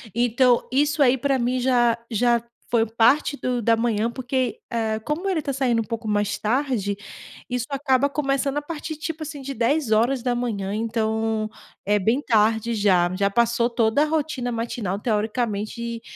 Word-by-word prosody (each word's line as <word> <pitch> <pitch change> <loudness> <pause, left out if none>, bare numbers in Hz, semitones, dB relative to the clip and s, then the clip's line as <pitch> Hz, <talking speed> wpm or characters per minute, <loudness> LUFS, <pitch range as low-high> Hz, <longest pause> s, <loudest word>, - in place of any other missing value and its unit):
então, 245 +1 +3
isso 290 +2 +2
aí 260 0 +4
para 275 +1 +1
mim 250 +1 0
já 240 -2 +3
já 235 +1 +2 0.3
foi 230 -2 +3
parte 235 +6 +3
do 250 -3 -2
da 230 +1 +3
manhã 225 -1 0
porque, 255 -2 -2
ah, 220 -2 -1
como 325 +6 -2
ele 365 -4 +1
está 290 - -3
saindo 250 -4 +1
um - - -3
pouco 230 0 -5
mais 205 -1 0
tarde, 230 -4 0 0.5
isso 245 -1 -2
acaba 275 -1 +1
começando 275 -1 -1
a - - 0
partir, 315 +1 -6
tipo, 315 +1 -5
assim, 295 -2 -7
de 275 +1 -5
10h, 240 -4 0
então, 220 0 -1 0.4
é 205 +1 +2
bem 225 +8 +1
tarde 225 -2 +2
já, 185 -4 +2
já 200 +1 +1
passou 235 +2 +2
toda 230 +2 +2
a - - +2
rotina 300 -5 -2
matinal, 230 -4 -3
teoricamente, 225 +1 -2
235 Hz, 160 wpm, -23 LUFS, 220-270 Hz, 0.5 s, aí